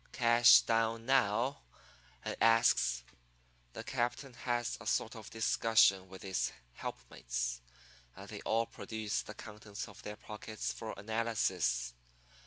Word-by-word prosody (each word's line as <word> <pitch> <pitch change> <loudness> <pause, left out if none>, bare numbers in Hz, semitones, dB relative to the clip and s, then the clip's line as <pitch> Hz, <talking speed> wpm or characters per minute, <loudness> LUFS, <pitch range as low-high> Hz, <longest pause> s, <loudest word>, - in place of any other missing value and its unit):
"'Cash 120 0 +7
down 115 0 +1
now?' 130 +1 +2 0.7
I - - -2
asks. 115 - +4 0.7
"The - - -6
captain 125 +1 -2
has 120 -1 -2
a 115 - -8
sort 115 +2 0
of 110 -2 -9
discussion 110 -4 +3
with 95 0 -11
his 95 -1 -1 0.2
helpmates, - - -4 0.5
and - - -10
they - - -8
all 115 +1 +1
produce 110 -2 -3
the 105 - -10
contents 105 +1 -8
of 105 - -13
their 105 - -6
pockets 105 +1 -5
for 110 -1 -6
analysis. 100 - 0
110 Hz, 125 wpm, -34 LUFS, 105-115 Hz, 0.7 s, Cash